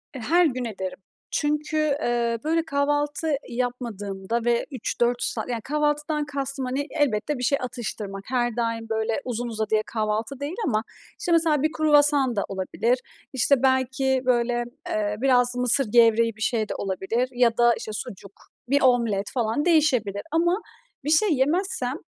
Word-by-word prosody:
E, - - -5
her 340 +9 +3
gün 255 -4 -1
ederim. 190 -4 -5 0.4
Çünkü, 300 +1 0 0.2
eee, 235 -1 0
böyle, 325 +1 +1
kahvaltı 290 +1 0
yapmadığımda 235 -3 -3
ve 235 0 +2
3-4 240 -1 -1
saat - - -2
yani, 235 -2 -2
kahvaltıdan 295 +1 -1
kastım, 275 -2 -3
hani, 275 +4 -2
elbette 290 -2 0
bir 250 - -5
şey 280 +3 +2
atıştırmak, 215 -5 -5
her 240 -2 0
daim, 230 -1 -2
böyle, 220 +4 -1
uzun 245 -1 -3
uzadıya 220 -1 0
kahvaltı 220 +4 -2
değil 290 +5 -4
ama 215 -3 +1 0.4
işte 360 -5 -2
mesela 320 -4 +3
bir 310 - +2
kruvasan 290 -5 +3
da 200 - 0
olabilir. 225 +6 0 0.3
İşte, 260 +1 +3
belki, 265 0 +2
böyle, 240 -1 +1 0.3
eee, 210 -1 -1
biraz 245 -2 +3
mısır 250 +2 +3
gevreği 230 -1 +4
bir 220 - -15
şey 220 -2 0
de - - -3
olabilir 200 +6 -2
ya 240 -2 +2
da, 240 0 +5
işte, 215 - -6
sucuk, 200 -2 -7 0.4
bir 280 0 +3
omlet 230 -6 +2
falan, 240 +4 0
değişebilir 255 - +2
ama 345 +5 +2 0.4
bir - - -1
şey 345 +7 +4
yemezsem, 285 -2 0
245 Hz, 155 wpm, -24 LUFS, 225-290 Hz, 0.4 s, da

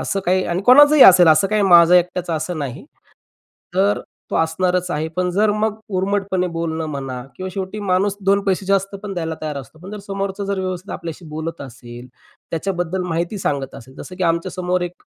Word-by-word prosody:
असं 195 - -2
काही 185 +1 +2
आणि 175 +3 -2
कोणाचंही 290 +4 +7
असेल 180 -2 +8
असं 160 +5 +5
काही 215 0 +1
माझं 175 -2 +6
एकट्याच 180 0 +1
असं 165 +1 -3
नाही. 140 -1 -5 0.9
तर 200 +2 +2 0.3
तो - - -1
असणारच 180 +2 0
आहे. 155 0 -2
पण 180 0 0
जर 205 +4 +2
मग 215 0 -1 0.2
उर्मटपणे 190 -1 0
बोलणं 165 -1 -3
म्हणा 135 -3 -5
किंवा 185 0 -5
शेवटी 195 +2 -5
माणूस 195 0 0
2 200 +1 +3
पैसे 195 0 -1
जास्त 195 0 0
पण 205 -2 -5
द्यायला 165 -2 -3
तयार 155 -2 -4
असतो, 140 +3 -10
पण 180 +4 -11
जर 210 - -7
समोरचं 195 0 -3
जर 200 0 -2
व्यवस्थित 185 +1 -5
आपल्याशी 165 +1 -7
बोलत 160 +2 -6
असेल, 120 -2 -10 0.4
त्याच्याबद्दल 175 +1 -2
माहिती 170 +4 -2
सांगत 140 -7 -2
असेल. 130 +2 -12
जसं 185 +5 -9
की 185 - -4
आमच्यासमोर 180 +2 -1
एक 175 0 -7
180 Hz, 185 wpm, -20 LUFS, 160-195 Hz, 0.9 s, असेल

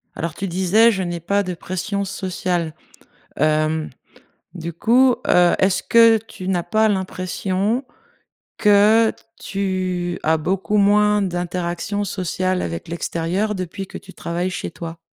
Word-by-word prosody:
Alors, 165 -1 -4
tu 195 - -4
disais, 190 +6 +4
je 190 -3 -2
n'ai 175 -1 -3
pas 200 +5 0
de 180 - -4
pression 200 +4 -3
sociale. 180 -4 -2 0.6
Hem, 155 0 +1 0.6
du 170 -1 -5
coup, 245 +6 +4
heu, 175 -1 +5
est-ce 190 0 +2
que 230 -1 +6
tu 190 -4 -9
n'as 180 -2 +1
pas 220 +2 +2
l'impression 190 +4 -1 0.7
que 215 +1 +5 0.3
tu 185 -3 -2
as 160 +1 +3
beaucoup 190 +6 -1
moins 210 0 +4
d'interactions 180 +2 -2
sociales 185 -1 -2
avec 85 - -5
l'extérieur 170 +5 -2
depuis 185 +1 -5
que - - -10
tu 190 - -14
travailles 175 +2 -3
chez - - -4
toi? 165 -1 -8
185 Hz, 135 wpm, -21 LUFS, 175-205 Hz, 0.7 s, que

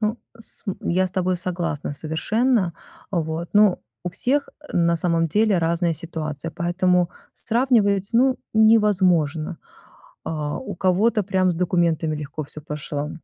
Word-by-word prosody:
Ну, 215 +2 -1 0.2
с 225 - -11 0.2
я 185 +2 +1
с - - -8
тобой 185 0 0
согласна 175 -5 -3
совершенно. 185 - 0 0.4
Вот, 165 -2 -2
но 205 -3 +4 0.2
у 180 - -2
всех, 270 +10 0 0.2
на 170 -1 +2
самом 165 0 +1
деле, 210 +3 +3
разная 170 0 +1
ситуация, 155 -1 -5
поэтому 175 +1 +1 0.2
сравнивать, 220 -5 +1
ну, 255 +2 +4 0.2
невозможно. 185 -8 +3 0.7
А, 150 -2 -3
у 260 - -6
кого-то 205 +4 +2
прям 190 -1 +1
с - - -4
документами 170 -3 +1
легко 150 +1 -5
всё 150 +1 -7
пошло, 150 0 -4
180 Hz, 130 wpm, -23 LUFS, 160-205 Hz, 0.7 s, но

